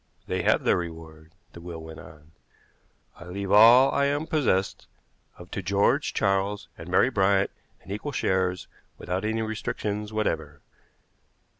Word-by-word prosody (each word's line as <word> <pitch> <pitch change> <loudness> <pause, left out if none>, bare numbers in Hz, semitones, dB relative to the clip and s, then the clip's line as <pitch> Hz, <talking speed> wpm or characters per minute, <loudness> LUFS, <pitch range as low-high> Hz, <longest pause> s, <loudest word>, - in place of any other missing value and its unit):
"They - - -2
have - - +2
their - - +3
reward," 80 -1 -8 0.2
the 85 - -11
will 85 -1 -7
went 80 0 -10
on. 75 +1 -15 0.9
"I 85 - -12
leave 95 +2 -5
all 120 +6 +7
I 140 - +1
am 145 +2 0
possessed 130 - 0 0.5
of 90 +1 -13
to 95 - -4
George, 100 - +1
Charles, 100 +1 0
and 80 - -10
Mary 105 +8 +3
Bryant 100 -2 +2 0.3
in 95 - -10
equal 105 +9 -4
shares, 95 -6 -1 0.3
without 90 +3 -3
any 110 +1 -1
restrictions 105 -1 -4
whatever. 80 -9 -3
95 Hz, 145 wpm, -26 LUFS, 85-110 Hz, 0.9 s, all